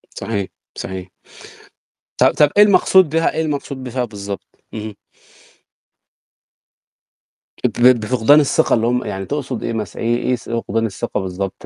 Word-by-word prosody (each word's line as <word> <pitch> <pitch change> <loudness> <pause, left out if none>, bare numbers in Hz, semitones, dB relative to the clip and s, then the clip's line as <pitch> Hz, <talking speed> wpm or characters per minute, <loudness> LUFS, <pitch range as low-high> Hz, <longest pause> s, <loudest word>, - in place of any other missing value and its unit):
صحيح 100 -2 -3 0.3
صحيح. 95 -1 -6 1.1
طب - - +5
طب 150 -1 +4
إيه 210 - +9
المقصود 190 -4 +5
بيها 165 +1 +1
إيه 160 - -1
المقصود 140 -3 -4
بفيها 125 0 -2
بالضبط؟ 100 -2 -9
اهم. 105 -2 -6 2.7
ب 125 0 +4
بفقدان 125 +6 +4
الثقة 145 - +2
اللي 115 0 +2
هُم 125 +1 0
يعني 95 0 -4
تقصد 140 -4 -4
إيه 115 - -2
مثلًا؟ 105 -3 -5
إيه 120 +1 +1
إيه 125 +1 0
س 120 - -12
فقدان 115 -1 -1
الثقة 110 +2 -3
بالضبط 95 +1 -5
115 Hz, 140 wpm, -19 LUFS, 105-135 Hz, 2.7 s, إيه